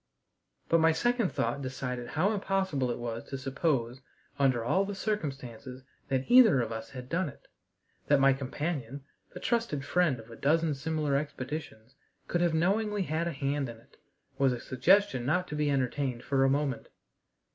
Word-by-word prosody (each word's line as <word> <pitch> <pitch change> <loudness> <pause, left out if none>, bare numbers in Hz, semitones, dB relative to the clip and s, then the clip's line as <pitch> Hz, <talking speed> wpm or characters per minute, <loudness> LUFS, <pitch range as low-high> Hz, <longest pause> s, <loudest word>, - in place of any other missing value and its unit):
But 165 - +4
my 160 0 +5
second 240 +1 +1
thought 140 - -1
decided 125 -2 -4
how 180 - +1
impossible 190 -10 0
it 120 - -2
was 115 -1 -4
to 135 - -5
suppose, 135 -2 -1 0.4
under 130 -4 +2
all 190 +10 +2
the 200 0 -4
circumstances, 135 - -4 0.2
that 130 -1 0
either 240 - +7
of 115 -2 -1
us 115 0 -5
had 125 -2 -8
done 170 +2 -1
it. 140 - -16 0.6
That 145 -1 +4
my 135 0 +5
companion, 140 -1 -4 0.3
the - - -5
trusted 225 - -1
friend 170 -8 +2
of 115 +1 -13
a - - -9
dozen 160 +4 +2
similar 150 0 -1
expeditions, 135 -4 -5 0.3
could 175 - 0
have 170 -2 +2
knowingly 205 +4 +1
had 165 0 -1
a - - -1
hand 140 -1 -2
in 115 - -9
it, 115 - -23 0.4
was 135 -2 +4
a 120 - -4
suggestion 180 +2 +3
not 180 +8 +1
to 150 - -4
be 150 -1 +1
entertained 130 -2 -1
for 135 0 +2
a 135 - +4
moment. 140 -3 -1
140 Hz, 175 wpm, -30 LUFS, 130-170 Hz, 0.6 s, either